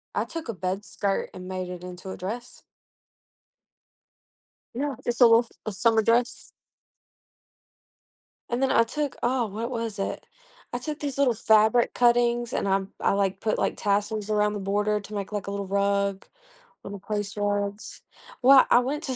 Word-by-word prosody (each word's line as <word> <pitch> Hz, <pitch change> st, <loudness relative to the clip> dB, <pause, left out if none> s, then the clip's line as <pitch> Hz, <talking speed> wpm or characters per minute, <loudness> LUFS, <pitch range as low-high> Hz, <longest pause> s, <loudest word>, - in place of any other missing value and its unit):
I -, -, 0 dB
took 330 Hz, -3 st, -7 dB
a 230 Hz, -, -3 dB
bed 190 Hz, +1 st, -3 dB
skirt 200 Hz, -1 st, -2 dB
and 185 Hz, 0 st, -9 dB
made 185 Hz, -1 st, -4 dB
it 180 Hz, -1 st, -7 dB
into 180 Hz, +1 st, -8 dB
a -, -, -7 dB
dress. 235 Hz, +7 st, -7 dB, 2.1 s
Yeah, 280 Hz, +2 st, -2 dB
just 240 Hz, +1 st, -2 dB
a -, -, +10 dB
little 230 Hz, +1 st, +5 dB, 0.2 s
a 215 Hz, -, -1 dB
summer 225 Hz, +2 st, +3 dB
dress. 235 Hz, +2 st, 0 dB, 2.0 s
And 240 Hz, +2 st, -1 dB
then 270 Hz, -, +2 dB
I -, -, +5 dB
took 285 Hz, +4 st, -3 dB
Oh, 245 Hz, 0 st, +1 dB
what 225 Hz, +4 st, -5 dB
was 230 Hz, -3 st, -3 dB
it? 195 Hz, -, -3 dB, 0.5 s
I -, -, 0 dB
took 300 Hz, +4 st, -5 dB
these 280 Hz, -3 st, -4 dB
little 275 Hz, -3 st, +3 dB
fabric 220 Hz, +2 st, +3 dB
cuttings 240 Hz, 0 st, +2 dB
and -, -, -1 dB
I'm 195 Hz, 0 st, 0 dB
I, -, -, +2 dB
like, 195 Hz, -1 st, 0 dB
put, 215 Hz, -, 0 dB
like, -, -, 0 dB
tassels 205 Hz, +1 st, -1 dB
around 210 Hz, 0 st, +2 dB
the 205 Hz, -, -4 dB
border 205 Hz, +2 st, 0 dB
to 205 Hz, +1 st, -11 dB
make, 200 Hz, -1 st, -4 dB
like, 205 Hz, -2 st, -3 dB
a -, -, -3 dB
little 200 Hz, 0 st, -3 dB
rug, 200 Hz, 0 st, 0 dB, 0.6 s
little 200 Hz, 0 st, -7 dB
place 205 Hz, 0 st, -4 dB
rugs. 205 Hz, 0 st, -2 dB, 0.4 s
Well, 265 Hz, +1 st, +8 dB
I -, -, +7 dB
went 280 Hz, +5 st, -2 dB
to 260 Hz, -, -2 dB
210 Hz, 170 wpm, -26 LUFS, 200-240 Hz, 2.1 s, a